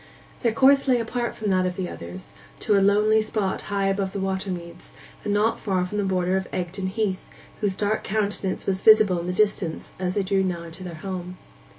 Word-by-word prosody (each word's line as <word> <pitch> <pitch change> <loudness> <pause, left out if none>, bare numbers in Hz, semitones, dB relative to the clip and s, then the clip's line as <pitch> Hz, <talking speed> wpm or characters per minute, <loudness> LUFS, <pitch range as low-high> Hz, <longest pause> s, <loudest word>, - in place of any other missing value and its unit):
Their 235 - +2
course 275 +4 +5
lay 250 -2 +4
apart 235 +1 -2
from 210 -2 -2
that 185 -1 +2
of 180 - -3
the 185 -1 -3
others, 90 - -9 0.3
to 210 - +2
a 200 - +4
lonely 210 +2 +4
spot 215 -3 -1
high 200 -1 0
above 195 -1 0
the 200 - -3
water 190 0 -2
meads, 170 -2 -7 0.3
and 205 - -1
not 210 +2 +2
far 185 -4 0
from 210 +3 -3
the - - +1
border 185 -1 +1
of 190 - -3
Egdon 185 +2 -3
Heath, 195 -1 -1 0.4
whose 205 -3 0
dark 210 +2 0
countenance 205 -2 -2
was 190 -1 -1
visible 215 -5 +6
in 170 - -5
the - - 0
distance 190 -4 0
as 185 0 -1
they 200 - +1
drew 195 0 +1
nigh 170 -3 -3
to 185 - -10
their 175 -2 -6
home. 180 -1 -5
195 Hz, 215 wpm, -24 LUFS, 185-210 Hz, 0.4 s, visible